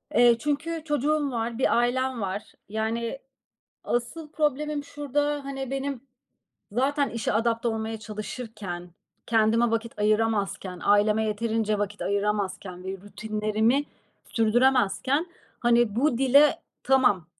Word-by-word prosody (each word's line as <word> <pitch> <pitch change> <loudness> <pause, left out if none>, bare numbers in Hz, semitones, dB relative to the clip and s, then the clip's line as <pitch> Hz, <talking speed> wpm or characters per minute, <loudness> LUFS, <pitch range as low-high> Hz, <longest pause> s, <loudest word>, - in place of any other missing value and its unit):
Eee, 240 0 +6
çünkü 310 +4 -2
çocuğum 295 -1 +1
var, 230 -1 -2
bir 260 - +2
ailem 250 0 +1
var. 195 +1 -4 0.2
Yani, 225 +4 -2 0.7
asıl 245 +7 -2
problemim 300 -1 0
şurada, 290 0 -1
hani, 270 -1 -5
benim 275 -1 -3 0.7
zaten 275 +5 +1
işe 230 -1 -2
adapte 230 +1 +1
olmaya 220 0 -3
çalışırken, 215 -4 -6 0.4
kendime 230 +1 +3
vakit 230 0 -2
ayıramazken, 205 -4 0
aileme 210 +2 +4
yeterince 215 0 0
vakit 205 0 -3
ayıramazken 200 -2 -2
ve 190 - -3
rutinlerimi 215 +5 0 0.4
sürdüremezken, 255 - +2 0.3
hani, 240 -3 +3
bu 255 -1 +2
dile, 275 +3 +5 0.3
tamam 250 -10 +3
230 Hz, 110 wpm, -26 LUFS, 215-270 Hz, 0.7 s, Eee